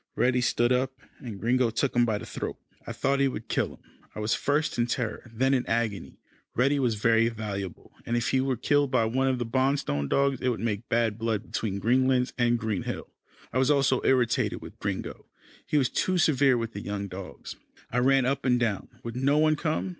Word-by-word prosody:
Reddy 125 0 +2
stood 120 0 +2
up, 130 +1 +1 0.3
and 110 -6 -7
Gringo 125 +2 +2
took 125 +4 -1
him 120 0 +4
by 110 -3 0
the - - -8
throat. - - -5 0.3
I - - -3
thought 135 +1 0
he 140 - +4
would 115 -4 -5
kill - - -1
him. - - -28 0.3
I - - -5
was 105 +1 0
first 145 -2 0
in 120 - +2
terror, 120 -1 -3
then 130 +4 +1
in 130 -2 +2
agony. 115 -3 -2 0.4
Reddy 140 +4 +2
was 120 -4 +1
very 115 +2 +3
valuable, 100 -5 -6
and 120 +1 -1
if 120 - 0
he 130 - +2
were 130 -2 0
killed 145 +4 +2
by 125 -4 +2
one 130 +4 +1
of 130 -1 +1
the 120 - -2
Bonstone 130 - 0
dogs, 140 -2 +1
it 130 - +1
would 120 - -2
make 110 -1 -3
bad 115 -2 +1
blood 110 -3 -1
between 100 -3 -3
Greenlands 125 +2 +2
and 120 -1 +2
Green 110 -4 -2
Hill. - - -5 0.4
I 130 - +1
was 130 +1 +3
also 135 -3 +3
irritated 120 -3 +2
with - - -12
Gringo. - - -4 0.4
He 150 - +1
was 135 -3 +3
too 185 +8 0
severe 140 -6 +4
with 115 -1 -3
the 100 - -5
young 100 0 -4
dogs. 95 0 -8 0.4
I 125 - +1
ran 135 +1 +4
up 135 +2 0
and 125 -2 +3
down. 110 -5 -1 0.2
Would 115 0 -6
no 140 +3 +2
one 155 0 +4
come? 155 +4 -1
125 Hz, 215 wpm, -27 LUFS, 115-135 Hz, 0.4 s, him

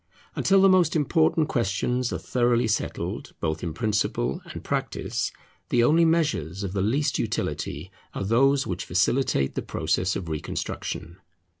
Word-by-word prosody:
Until 195 0 +4
the - - +8
most 185 -4 +4
important 160 +1 +2
questions 120 +3 0
are - - -1
thoroughly 120 -1 +1
settled, 105 - -3
both 80 0 -2
in 85 - -3
principle 105 - -1
and - - -8
practice, - - -2 0.4
the 120 -1 +3
only 165 +7 +5
measures 125 - 0
of 95 -2 -4
the 100 - 0
least 140 +8 +1
utility 80 +7 -3 0.2
are - - -2
those 135 +6 +3
which 90 -1 -4
facilitate 95 - +1
the - - -2
process 95 +1 -1
of 95 -4 -4
reconstruction. 80 +2 -4
115 Hz, 145 wpm, -25 LUFS, 95-145 Hz, 0.4 s, the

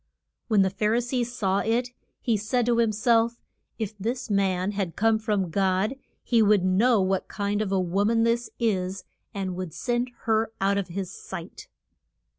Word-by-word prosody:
When 210 -4 +4
the 190 - +1
Phar 210 +3 +1
i - - +3
see 245 +1 -1
saw 205 -5 -1
it 240 +3 0 0.3
he 235 - +1
said 220 +4 0
to 235 -1 +2
him 230 -2 +3
self, 230 +2 +2 0.4
If 215 -2 -4
this 240 +3 -3
man 190 -1 +1
had 195 -5 -3
come 225 0 +3
from 205 -5 -1
God 195 +6 +1 0.3
he 235 -2 +3
would 205 -3 +4
know 215 +5 +4
what 190 0 0
kind 205 0 -2
of 205 -3 -2
a 195 - +2
wo 185 +3 +1
man 225 +1 +3
this 235 +1 +1
is, 190 -5 -1 0.3
and 190 -2 -3
would 180 -3 -5
send 245 0 -1
her 225 0 +1
out 200 +1 +2
of 195 - -3
his 185 +1 -5
sight. - - -9
210 Hz, 185 wpm, -26 LUFS, 190-230 Hz, 0.4 s, When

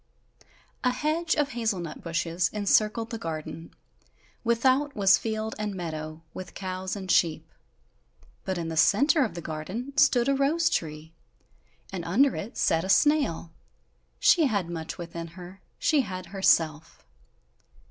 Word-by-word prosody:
A 250 - +4
hedge 315 +5 0
of 295 -2 +1
hazel 225 -5 -1
nut 170 -3 -7
bushes 170 0 -1
encircled 215 +2 +1
the 230 - -4
garden; 165 0 -6 0.7
without 260 +5 +2
was 195 -2 +5
field 220 0 -3
and 210 -2 -3
meadow, 155 -2 -6
with 185 - -8
cows 185 0 -4
and 190 -2 -4
sheep; 160 -1 +2 1.0
but 190 - -2
in 165 -1 -3
the 160 - -4
centre 280 - +4
of 220 - -3
the 170 - -6
garden 185 - -5
stood 275 -4 +4
a 275 - +3
rose 310 +4 +2
tree, 155 0 -3 0.8
and 180 -3 -4
under 245 +11 +3
it 215 - -6
sat 165 0 +2
a 190 - -5
snail 280 - +2 0.7
she 325 -5 +5
had 200 -8 -1
much 160 -1 -5
within 170 -1 -6
her, 185 +2 -11 0.2
she 305 -3 +3
had 185 -6 -6
herself. 165 -5 +1
195 Hz, 145 wpm, -27 LUFS, 165-250 Hz, 1.0 s, was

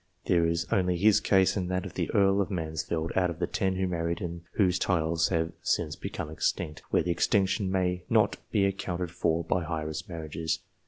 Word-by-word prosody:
There 85 -2 +3
is 85 +1 0
only 90 -2 +2
his 105 +3 +5
case 95 -2 +3
and 90 -3 -2
that 95 +1 -1
of 95 - -7
the - - -2
Earl 100 0 +3
of 100 - -2
Mansfield, 80 -2 -2
out 90 -1 +3
of 85 - -5
the - - 0
ten 95 -1 -1
who 95 0 0
married 85 -1 -1
and 85 -1 -5
whose 95 -3 +2
titles 85 -2 +1
have 80 -2 0
since 75 -1 0
become 75 - -5
extinct, 75 0 -2
where - - +2
the 85 - 0
extinction 95 +3 +1
may 90 -1 0
not - - +3
be 100 - +2
accounted 90 -3 -2
for 85 -1 0
by 85 +2 0
heiress 80 0 -4
marriages. 80 -1 -3
90 Hz, 200 wpm, -28 LUFS, 80-95 Hz, -, his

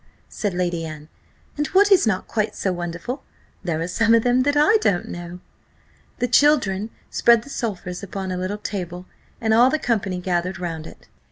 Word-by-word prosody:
said 205 -4 -3
Lady 175 -2 -1
Anne; 155 -1 -8 0.5
"and 295 0 0
what 405 +2 +4
is 365 - +6
not 185 -4 0
quite 215 -1 -1
so 190 - -1
wonderful, 175 +10 -5 0.4
there 170 -4 -1
are 165 - -2
some 225 +5 +3
of 230 - +3
them 245 +1 +3
that 285 +2 +1
I 415 +10 +5
don't 180 - +1
know." 175 +1 -7 0.8
The 245 - 0
children 240 -7 +3 0.2
spread 235 -1 +4
the 280 - -12
sulphurs 180 -8 -4
upon 195 -1 -5
a 180 - -2
little 185 +3 -3
table, 180 -4 -5 0.3
and 220 -1 +1
all 240 +3 +6
the 310 - +1
company 210 -9 -1
gathered 180 +1 -1
round 165 -3 -5
it. - - -15
195 Hz, 185 wpm, -22 LUFS, 175-240 Hz, 0.8 s, is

